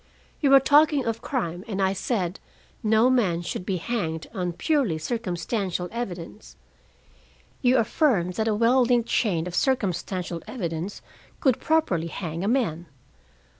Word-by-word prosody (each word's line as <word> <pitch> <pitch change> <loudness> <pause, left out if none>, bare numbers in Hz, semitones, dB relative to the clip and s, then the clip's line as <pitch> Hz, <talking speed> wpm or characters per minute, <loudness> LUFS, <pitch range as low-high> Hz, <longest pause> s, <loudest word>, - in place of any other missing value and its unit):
"We 285 - +3
were 275 0 +8
talking 290 0 +4
of 230 0 -2
crime, 180 -10 -3
and 200 -3 -3
I 190 0 +2
said 190 -3 -2 0.4
no 220 +2 +4
man 200 -10 +2
should 180 +1 -5
be 190 - 0
hanged 165 -5 -3
on 180 -4 -2
purely 265 - +1
circumstantial 185 -1 -2
evidence. 210 -4 -6 1.1
You 255 0 +4
affirmed 220 - +2
that 220 +4 -1
a 215 - +2
well 235 +4 +4
linked 240 -1 +2
chain 175 -8 +1
of 180 - -6
circumstantial 185 - -1
evidence 175 -4 -4 0.4
could 260 -6 +2
properly 310 - +1
hang 165 0 -5
a - - -1
man. 200 -9 0
205 Hz, 140 wpm, -25 LUFS, 175-245 Hz, 1.1 s, were